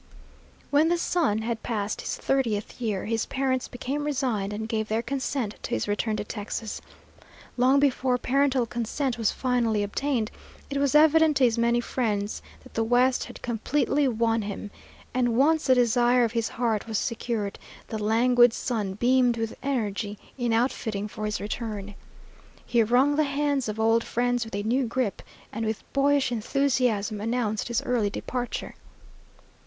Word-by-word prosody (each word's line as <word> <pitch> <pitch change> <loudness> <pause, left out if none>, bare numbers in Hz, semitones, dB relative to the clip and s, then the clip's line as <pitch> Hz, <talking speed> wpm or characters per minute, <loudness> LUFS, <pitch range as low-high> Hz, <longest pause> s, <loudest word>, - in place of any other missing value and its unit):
When 300 +3 +4
the 345 - +2
son 300 -12 +1
had 230 -1 -2
passed 215 -3 -2
his - - -3
thirtieth 240 -4 -1
year, 210 -5 -1
his 225 0 -1
parents 260 -1 -1
became 270 +4 -4
resigned 255 -9 -1
and 220 +1 -4
gave 220 -1 -1
their 220 +2 -1
consent 260 -4 -2
to - - -5
his 110 - -2
return 215 +1 0
to 210 - -2
Texas. 215 +1 -5 0.7
Long 260 +3 +4
before 260 -2 +2
parental 265 0 +2
consent 240 +2 -2
was 225 - +2
finally 235 -5 0
obtained, 230 +2 -1 0.4
it 280 - -1
was 280 0 +1
evident 315 0 +6
to 270 - +2
his 235 -2 +3
many 235 +1 +3
friends 215 -4 -2 0.2
that - - -16
the 225 - 0
West 245 +2 +3
had - - -11
completely 275 +4 +1
won 230 -1 +1
him; 205 0 -6 0.4
and 245 -2 +1
once 310 +4 +3
the 260 - +6
desire 245 0 +4
of 230 - +1
his 230 -1 -1
heart 230 -3 -1
was 220 -2 -1
secured, 225 -3 -2 0.3
the 220 -1 -4
languid 240 +2 +4
son 210 -7 -2
beamed 245 +1 +3
with 225 -1 -3
energy 215 -6 -2 0.2
in 245 -3 -1
outfitting 225 -3 0
for 215 0 -6
his 210 0 -2
return. 210 -1 -5 0.7
He 235 -1 +2
wrung 255 +6 +3
the 310 - +4
hands 280 -3 0
of 215 +1 -4
old 225 +1 +3
friends 245 0 0
with 225 - -7
a 205 - -2
new 245 +4 +1
grip, 235 -3 -1 0.3
and 225 - -3
with 220 -1 -2
boyish 280 -1 +3
enthusiasm 235 -4 0
announced 225 -1 -1
his 235 -1 -1
early 235 -5 +1
departure. 245 +4 -4
235 Hz, 165 wpm, -26 LUFS, 220-260 Hz, 0.7 s, evident